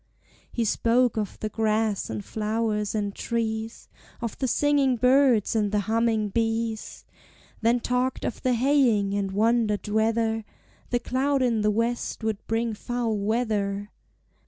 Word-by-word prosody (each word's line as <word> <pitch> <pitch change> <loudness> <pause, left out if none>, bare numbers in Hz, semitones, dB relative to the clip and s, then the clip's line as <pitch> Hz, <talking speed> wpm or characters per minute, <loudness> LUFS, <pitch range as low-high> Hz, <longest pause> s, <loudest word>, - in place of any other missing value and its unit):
He 235 - -1
spoke 240 +3 +2
of 210 -3 -3
the 215 - -2
grass 215 -1 0
and 110 -2 -5
flowers 215 -1 -1
and 205 -2 -1
trees, 225 0 -3 0.3
Of 230 -3 -4
the 265 - 0
singing 280 0 +2
birds 250 -3 +3
and 210 -2 +1
the 210 -1 +1
humming 220 0 +1
bees; 225 +1 -2 0.6
Then 235 +2 +3
talked 250 +2 -1
of - - -4
the 255 -1 +2
haying, 235 -6 +3
and 200 -1 -1
wondered 220 0 +1
whether 220 +1 +1 0.5
The 245 - +1
cloud 270 +2 +1
in 230 -3 +1
the 210 - +2
west 230 +2 -1
would 220 -2 -2
bring 225 0 0
foul 235 +1 -2
weather. 205 -1 -1
225 Hz, 140 wpm, -26 LUFS, 210-240 Hz, 0.6 s, birds